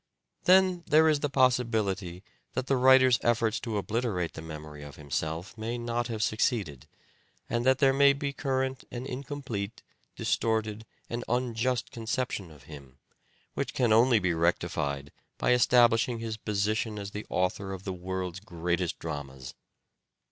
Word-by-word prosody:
Then 185 -1 +5
there 160 +1 +5
is 155 -2 +3
the 145 - -1
possibility 110 -9 +1 0.3
that 130 - -2
the 135 - +2
writer's 130 -1 +6
effort 115 -2 +2
to 115 -4 -3
obliterate 105 -5 -1
the - - -8
memory 75 -2 -9
of 75 -1 -10
himself 80 +5 -4
may 115 +2 -4
not 120 0 -2
have 110 -3 -2
succeeded, 100 - -1 0.6
and 120 0 -1
that 130 0 +5
there 135 0 +4
may 140 0 +6
be 140 0 -3
current 130 -1 -2
an 125 +1 -6
incomplete, 125 -6 -5 0.3
distorted 110 -1 -1 0.2
and 120 +1 -4
unjust 125 0 0
con 115 -3 -8
ception 110 -7 -2
of 75 -3 -16
him, 70 -4 -12 0.6
which - - -3
can 120 -4 +3
only 120 +2 +5
be 90 -4 +1
rectified 80 -4 -1 0.3
by - - +1
establishing 120 -1 +4
his 115 -1 -4
position 105 +1 -1
as 100 -1 -6
the 105 +1 -6
author 95 +1 -1
of 95 -1 -6
the 95 - -3
world's 90 0 -4
greatest 90 -3 -2
dramas. 70 -4 -7
110 Hz, 150 wpm, -29 LUFS, 90-125 Hz, 0.6 s, writer's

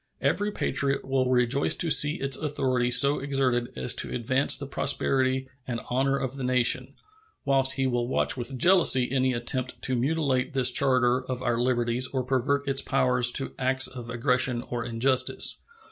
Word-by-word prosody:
Every 205 0 -1
patriot 140 -9 -2
will 130 -1 0
rejoice 125 +2 +1
to 165 - 0
see 150 +2 +4
its 135 -5 0
authority 130 -5 -2
so 140 +4 +4
exerted 130 -3 -1
as 125 - +1
to - - +1
advance 130 +3 +1
the 140 - -7
prosperity 130 -1 0 0.2
and 120 -2 -4
honor 135 +2 0
of 135 0 -5
the 135 - -6
nation, 125 -1 +1 0.5
whilst 135 -1 +1
he 135 0 -2
will 120 -2 -1
watch 130 - 0
with 130 +1 -6
jealousy 160 -6 +4
any 130 -1 0
attempt 125 +2 -2
to 130 - -1
mutilate 135 0 -1
this 125 -2 +4
charter 130 -1 +2
of 130 -1 -6
our 120 -2 -1
liberties 120 0 0
or 130 -1 -3
pervert 135 +2 -1
its 135 0 +1
powers 125 -3 +1
to 135 - -1
acts 130 0 +2
of 125 -3 -6
aggression 125 0 0
or 120 -1 -3
injustice. 125 +2 +1
130 Hz, 170 wpm, -25 LUFS, 125-135 Hz, 0.5 s, see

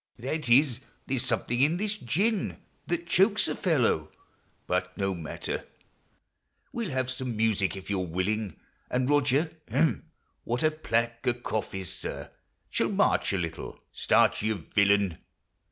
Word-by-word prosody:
— - - -44
That 135 +3 -3
is, 125 0 +5 0.3
there 135 -1 -1
's 125 - +3
something 120 +1 +1
in 155 +5 +4
this 210 +2 -1
gin 200 - 0 0.3
That 170 0 -1
chokes 195 +5 +4
a - - 0
fellow. 125 - +1 0.5
But 90 0 -1
no 95 -1 0
matter! 85 -3 -4 1.1
We 235 -1 -2
'11 140 -9 -3
have 130 -1 0
some 130 -3 -4
music, 110 -4 +2
if 95 - -9
you 100 - +1
're 90 - -3
willing, 95 +4 -1 0.3
And 125 0 0
Roger 145 +2 +3 0.2
(hem! 140 +7 +1 0.3
what 120 +4 -1
a 155 - +4
plague 115 -7 0
a 125 - +3
cough 110 -4 -3
is, 95 -2 -4
sir - - -6 0.2
!) - - -45
Shall - - +1
march - - +2
a 95 - 0
little. 85 -3 -5
Start, - - +3
you 110 +1 +1 0.2
villain 100 -4 +3
120 Hz, 165 wpm, -28 LUFS, 100-150 Hz, 1.1 s, is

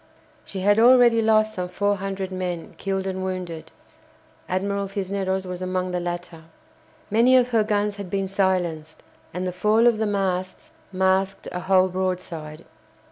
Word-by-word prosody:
She 190 - -7
had 205 +3 +4
already 240 -1 +6
lost 215 -1 +3
some 180 -2 -4
four 205 +2 0
hundred 195 0 -4
men 180 -2 -4
killed 195 -1 -2
and 190 -1 -3
wounded 180 -4 -5 0.8
(Admiral 200 +2 -1
Cisneros 190 -1 -2
was 180 0 -6
among 185 0 -2
the 180 - -1
latter). 175 -2 -6 0.7
Many 240 +4 +5
of 250 -1 +3
her 225 -3 +3
guns 210 -1 -1
had 200 -3 -7
been 195 0 -1
silenced, 180 -5 -1 0.3
and 180 +2 -4
the 180 - -1
fall 210 +6 +2
of 235 -3 +4
the 220 - +1
masts 185 -2 -2 0.2
masked 190 +1 0
a 180 - -4
whole 185 0 +3
broadside. 180 -4 -4
190 Hz, 155 wpm, -23 LUFS, 180-205 Hz, 0.8 s, already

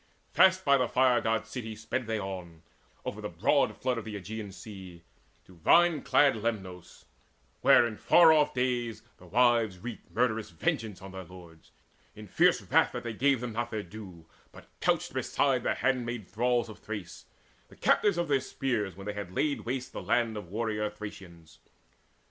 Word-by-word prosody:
Fast 185 0 +5
by 140 -1 +5
the 125 -2 +1
Fire 125 -1 +3
god's 110 0 -1
city 110 -4 -5
sped 120 +3 -4
they 110 -1 -1
on 90 -4 -7 0.4
Over - - -5
the - - -4
broad - - +1
flood 125 -2 -1
of 110 - -9
the 110 -1 -6
Aegean 105 +1 -6
Sea 95 -3 -11 0.4
To 95 - -17
vine 165 - +4
clad 145 -2 +4
Lemnos, 95 -6 -5 0.6
where - - +6
in 110 -2 -4
far 165 -2 +6
off 150 -2 +3
days 125 -2 -1
The 90 - -16
wives 115 -1 +3
wreaked 115 +4 -8
murderous 110 -3 0
vengeance 95 +4 -3
on 95 - -9
their 95 0 -7
lords, 85 -2 -15 0.5
In - - -10
fierce - - +3
wrath - - +2
that - - -5
they 120 -1 -4
gave 135 +2 +2
them 120 -2 -4
not 120 +1 -2
their 110 -2 -4
due, 90 -4 -11 0.3
But - - -14
couched - - 0
beside - - +1
the - - 0
handmaid 120 -5 -1
thralls 120 +2 0
of 110 - -11
Thrace, 105 -5 -7 0.4
The - - -17
captives 205 -4 +2
of 170 -1 0
their 140 -2 +2
spears 110 -11 -2
when 95 +1 -10
they 105 0 -4
laid 140 +11 -2
waste 125 +1 -4
The - - -5
land 120 -2 +1
of 105 -5 -7
warrior 105 0 -2
Thracians. 95 -6 -11
110 Hz, 180 wpm, -29 LUFS, 95-125 Hz, 0.6 s, where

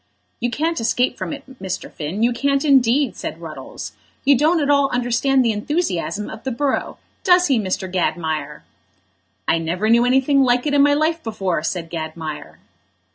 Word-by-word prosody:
"You 240 - 0
can't 320 +5 -1
escape 245 +2 +1
from - - -5
it, 285 -2 -6 0.2
Mr. 190 -1 -5
Finn, 170 +8 -3
you 240 +1 +3
can't 275 +3 0
indeed," 270 -1 +3
said - - -6
Ruddles. - - -8 0.3
"You 280 +1 +6
don't 315 +6 +3
at 290 - 0
all 280 -1 +3
understand 250 +2 +1
the 230 - +3
enthusiasm 210 - -2
of 220 - -9
the 265 - -2
borough; 265 +3 -1 0.3
does 360 -2 +5
he, 260 -4 +3
Mr. 190 -2 -2
Gadmire?" 160 -5 -2 0.8
"I 165 - +3
never 180 +7 0
knew 235 +1 +5
anything 265 +3 +3
like 245 0 +2
it 295 - 0
in 285 - +5
my 285 0 +5
life 320 +2 0
before," 195 -7 -2
said 165 0 -3
Gadmire. 160 -2 -6
245 Hz, 175 wpm, -20 LUFS, 185-280 Hz, 0.8 s, You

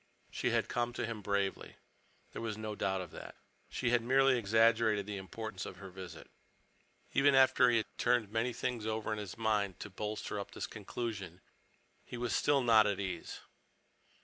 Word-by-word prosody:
She - - -1
had - - +1
come 120 0 -1
to 120 - -2
him 115 -2 -5
bravely. 100 -1 -1 0.6
There - - -6
was 110 -2 -3
no 110 0 -4
doubt 95 -2 -1
of 90 - -8
that. - - -9 0.3
She 120 - -1
had 120 -1 +4
merely 135 +2 +4
exaggerated 110 -1 +3
the 105 -1 -4
importance 95 0 -6
of - - -7
her 95 -2 -10
visit. 90 -3 -10 0.8
Even 140 0 +5
after 130 -1 +6
he 120 - +4
had 110 - -3
turned 120 -4 +2
many 115 +3 0
things 120 -2 -3
over 110 0 -1
in 105 - -3
his 100 -4 -7
mind 105 -4 0
to 105 - -7
bolster 105 +1 -4
up 100 - -7
this - - -4
conclusion, 100 -4 -5 0.6
he 120 - -8
was 120 -1 -1
still 140 -2 +3
not 110 -3 +6
at 100 -2 -1
ease. 95 -4 -5
110 Hz, 180 wpm, -33 LUFS, 100-120 Hz, 0.8 s, after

